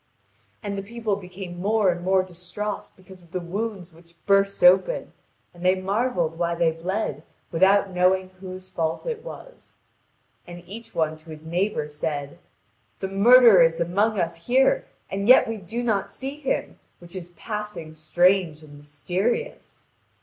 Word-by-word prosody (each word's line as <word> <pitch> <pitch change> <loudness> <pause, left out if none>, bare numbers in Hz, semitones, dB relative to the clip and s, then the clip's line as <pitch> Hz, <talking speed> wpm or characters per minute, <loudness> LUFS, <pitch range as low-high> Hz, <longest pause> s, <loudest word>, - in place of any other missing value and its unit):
And 200 -1 -3
the 195 - -3
people 220 0 -3
became 180 -2 -8
more 205 -1 +3
and 175 0 -5
more 190 0 +3
distraught 185 +3 -6
because 185 0 -15
of 170 - -20
the 185 - -1
wounds 190 0 -5
which 170 +1 -19
burst 195 0 +2
open, 190 - +4 0.4
and 175 0 -12
they 185 +1 +4
marvelled 185 -4 -1
why 170 0 0
they 170 -1 +2
bled, 165 -2 -3 0.3
without 190 +3 +3
knowing 185 +1 +2
whose 185 0 -9
fault 160 -1 -2
it 470 -2 -4
was. - - -12 0.7
And 175 0 -10
each 220 +6 -10
one 155 -1 0
to 155 +1 -18
his 155 0 -10
neighbour 175 -1 -1
said: 145 -1 -4 0.6
"The 190 - -3
murderer 225 0 +7
is 165 0 +3
among 200 +5 +1
us 165 -1 -3
here, 265 - +3 0.2
and 200 +1 -2
yet 255 - +7
we 225 0 -3
do 220 +5 -5
not 205 -4 0
see 270 +7 -6
him, 270 - -2 0.2
which 175 +1 -12
is 175 -2 -7
passing 210 -4 -6
strange 165 +1 +2
and 150 -1 -14
mysterious." 180 - -3
185 Hz, 155 wpm, -24 LUFS, 170-210 Hz, 0.7 s, murderer